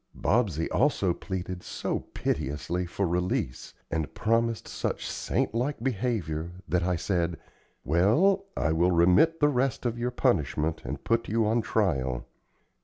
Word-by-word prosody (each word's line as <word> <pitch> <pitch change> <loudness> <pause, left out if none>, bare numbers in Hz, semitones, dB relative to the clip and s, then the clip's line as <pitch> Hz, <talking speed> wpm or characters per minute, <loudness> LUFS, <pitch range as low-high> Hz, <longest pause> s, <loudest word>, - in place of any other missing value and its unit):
Bobsey 95 -8 +1
also 110 -10 +2
pleaded 90 -1 -5
so - - -3
piteously 85 +6 -2
for 100 +3 -1
release, 90 -7 -2 0.2
and 80 -2 -1
promised 115 0 +1
such - - -3
saint - - -1
like 125 +2 -1
behavior, 95 - -1
that 85 +3 +1
I 90 +1 +1
said: 85 -1 -1 0.5
"Well, 110 - +3
I 75 - +1
will 85 +3 +3
remit 90 - +4
the 145 - +6
rest 130 -1 0
of 120 -1 -1
your 120 +1 0
punishment 80 - 0
and - - -5
put 115 0 0
you 110 +1 +2
on 115 +2 +2
trial. 65 - 0
95 Hz, 140 wpm, -28 LUFS, 85-115 Hz, 0.5 s, the